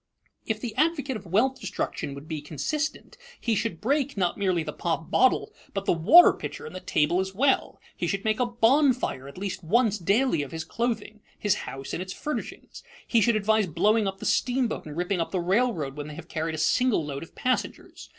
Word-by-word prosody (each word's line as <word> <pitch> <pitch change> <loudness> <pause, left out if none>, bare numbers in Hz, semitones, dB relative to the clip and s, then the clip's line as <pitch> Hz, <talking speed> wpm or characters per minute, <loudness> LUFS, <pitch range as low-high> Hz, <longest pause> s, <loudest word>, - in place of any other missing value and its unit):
If 220 -1 -1
the 225 -1 -5
advocate 290 -3 +1
of 210 - -8
wealth 245 +9 +2
destruction 185 -7 -4
would 140 +2 -10
be 155 -2 -4
consistent, 300 - -4 0.2
he 230 - 0
should 215 -5 -1
break, 275 +3 0
not 180 -3 +1
merely 185 -5 0
the - - -5
pop 165 -1 -3
bottle, 255 - +3 0.2
but 195 0 -2
the - - +3
water 225 - +7
pitcher - - -7
and - - -9
the - - -4
table 175 -1 +1
as 190 0 -3
well; 265 +5 +1 0.2
he - - -2
should 195 0 -2
make 215 +1 +1
a 250 - +2
bonfire 240 - +2
at 140 - -11
least 190 -1 -4
once 215 +4 +2
daily 205 - +2
of 140 - -6
his 160 -1 -4
clothing, 220 -2 -3 0.2
his 205 -2 +2 0.2
house, 135 0 -7
and - - -2
its 185 0 -5
furnishings; 300 - -6 0.2
he 230 - +3
should 235 +1 +3
advise 215 -1 +2
blowing 205 +6 +2
up 195 0 -3
the - - -8
steamboat 250 - 0
and 150 +1 -8
ripping 180 +1 0
up 165 - -2
the 185 - -1
railroad 175 - 0
when 145 0 -6
they 150 - -8
have 170 +1 -10
carried 160 -1 -3
a - - -6
single 200 +3 +2
load 140 -1 -5
of 165 - -11
passengers. 255 0 -3
200 Hz, 210 wpm, -26 LUFS, 165-245 Hz, 0.2 s, water